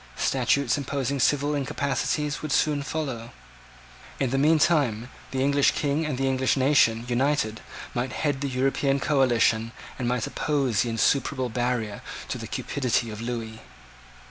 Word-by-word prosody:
Statutes 140 Hz, -1 st, +1 dB
imposing 140 Hz, 0 st, -2 dB
civil 145 Hz, +2 st, +2 dB
incapacities 140 Hz, +1 st, -1 dB
would 155 Hz, -, -4 dB
soon 145 Hz, +1 st, +2 dB
follow. 135 Hz, -6 st, -4 dB, 0.9 s
In 135 Hz, -3 st, 0 dB
the 135 Hz, -, +1 dB
meantime, 145 Hz, -6 st, +2 dB, 0.2 s
the 130 Hz, 0 st, -1 dB
English 140 Hz, 0 st, +3 dB
King 150 Hz, +2 st, 0 dB
and 140 Hz, -4 st, -2 dB
the 135 Hz, +1 st, 0 dB
English 130 Hz, 0 st, +1 dB
nation 130 Hz, -4 st, +3 dB
united 125 Hz, -3 st, 0 dB, 0.3 s
might 125 Hz, +1 st, -2 dB
head 145 Hz, -3 st, -1 dB
the 140 Hz, -, -1 dB
European 135 Hz, +2 st, +1 dB
coalition, 120 Hz, -5 st, +2 dB, 0.3 s
and 125 Hz, -, -1 dB
might 125 Hz, -2 st, 0 dB
oppose 135 Hz, -7 st, 0 dB
an -, -, -2 dB
insuperable 130 Hz, +2 st, +1 dB
barrier 120 Hz, -3 st, -2 dB, 0.3 s
to -, -, -3 dB
the -, -, -6 dB
cupidity 125 Hz, -4 st, -1 dB
of 105 Hz, +1 st, -7 dB
Lewis. 115 Hz, -2 st, -5 dB
135 Hz, 145 wpm, -26 LUFS, 120-140 Hz, 0.9 s, English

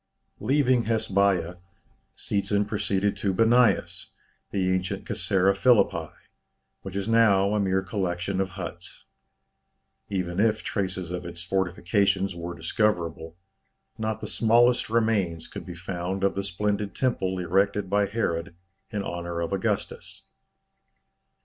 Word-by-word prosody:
Leaving 130 Hz, 0 st, +2 dB
Hasbeiya, 100 Hz, -6 st, +1 dB, 0.6 s
Seetzen 100 Hz, 0 st, 0 dB
proceeded 100 Hz, -1 st, 0 dB
to 95 Hz, -1 st, -1 dB
Bâniâs, 120 Hz, +3 st, +2 dB, 0.4 s
the 95 Hz, -2 st, 0 dB
ancient 95 Hz, +1 st, -2 dB
Casaræa 95 Hz, +1 st, +2 dB
Philippi, 95 Hz, -8 st, +3 dB, 0.7 s
which 95 Hz, -1 st, -8 dB
is 100 Hz, +1 st, -2 dB
now 105 Hz, -3 st, +4 dB
a 105 Hz, -, +1 dB
mere 95 Hz, -1 st, +1 dB
collection 95 Hz, -1 st, -2 dB
of 95 Hz, -, -1 dB
huts. -, -, -7 dB, 1.0 s
Even 90 Hz, -2 st, -2 dB
if 110 Hz, 0 st, +2 dB
traces 95 Hz, -3 st, -2 dB
of 90 Hz, 0 st, -4 dB
its 85 Hz, 0 st, -7 dB
fortifications 95 Hz, +2 st, 0 dB
were 85 Hz, 0 st, -6 dB
discoverable, 85 Hz, -3 st, -1 dB, 0.6 s
not 110 Hz, 0 st, -2 dB
the -, -, -4 dB
smallest 120 Hz, +3 st, +3 dB
remains 105 Hz, -8 st, +1 dB
could -, -, -9 dB
be 90 Hz, -, -7 dB
found 90 Hz, +2 st, -4 dB
of 100 Hz, -, +3 dB
the 100 Hz, -, -3 dB
splendid 100 Hz, +2 st, -2 dB
temple 95 Hz, -8 st, 0 dB
erected 95 Hz, +3 st, +1 dB
by 100 Hz, +1 st, +2 dB
Herod 90 Hz, -5 st, -2 dB, 0.3 s
in 105 Hz, -3 st, -3 dB
honour 85 Hz, -1 st, -4 dB
of 85 Hz, +3 st, -2 dB
Augustus. 95 Hz, -, -3 dB
95 Hz, 125 wpm, -26 LUFS, 90-105 Hz, 1.0 s, now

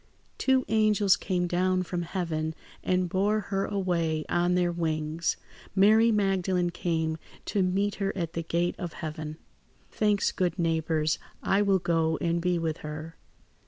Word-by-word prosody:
"Two 265 Hz, -1 st, +3 dB
angels 215 Hz, -2 st, +4 dB
came 180 Hz, -3 st, -1 dB
down 185 Hz, +1 st, +1 dB
from 175 Hz, 0 st, -3 dB
heaven 165 Hz, -3 st, -2 dB, 0.3 s
and 185 Hz, 0 st, +1 dB
bore 200 Hz, +4 st, +1 dB
her 195 Hz, -1 st, -2 dB
away 170 Hz, -5 st, -1 dB
on 175 Hz, +1 st, +2 dB
their 175 Hz, -1 st, +2 dB
wings. 160 Hz, -1 st, -1 dB, 0.4 s
Mary 220 Hz, +4 st, +6 dB
Magdalene 190 Hz, -4 st, +1 dB
came 160 Hz, -2 st, -1 dB, 0.3 s
to 200 Hz, -, 0 dB
meet 195 Hz, +2 st, +1 dB
her 195 Hz, 0 st, +1 dB
at 170 Hz, -2 st, -3 dB
the 165 Hz, -, -2 dB
gate 170 Hz, +1 st, 0 dB
of 175 Hz, -3 st, -4 dB
heaven. 155 Hz, -1 st, -6 dB, 0.5 s
"Thanks, 210 Hz, -1 st, +2 dB
good 180 Hz, -3 st, -1 dB
neighbours. 160 Hz, -2 st, +1 dB, 0.2 s
I 195 Hz, -, +3 dB
will 200 Hz, -2 st, +3 dB
go 165 Hz, -2 st, +1 dB
and 170 Hz, 0 st, 0 dB
be 180 Hz, 0 st, +1 dB
with 165 Hz, -1 st, -2 dB
her. 155 Hz, +2 st, -7 dB
175 Hz, 150 wpm, -28 LUFS, 165-195 Hz, 0.5 s, Mary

